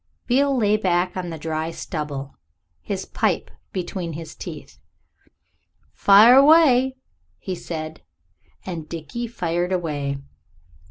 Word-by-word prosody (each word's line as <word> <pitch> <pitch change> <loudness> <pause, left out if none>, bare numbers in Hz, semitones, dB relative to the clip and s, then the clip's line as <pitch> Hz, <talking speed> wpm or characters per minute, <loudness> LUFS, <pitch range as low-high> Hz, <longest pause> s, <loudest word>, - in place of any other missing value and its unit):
Beale 275 +2 +2
lay 210 -2 +3
back 180 -3 0
on 180 -2 -4
the 165 - -6
dry 160 +1 -3
stubble, 150 -5 -5 0.5
his 85 - -4
pipe - - -1 0.2
between 175 -2 -4
his 160 0 -8
teeth. - - -9 1.1
"Fire 215 +6 +7
away," 270 -3 +6 0.4
he 185 - -5
said, 160 -2 -6 0.6
and 165 -4 -6
Dickie 170 +9 -5
fired 175 -5 -2
away. 145 -6 -2
175 Hz, 110 wpm, -23 LUFS, 160-220 Hz, 1.1 s, Fire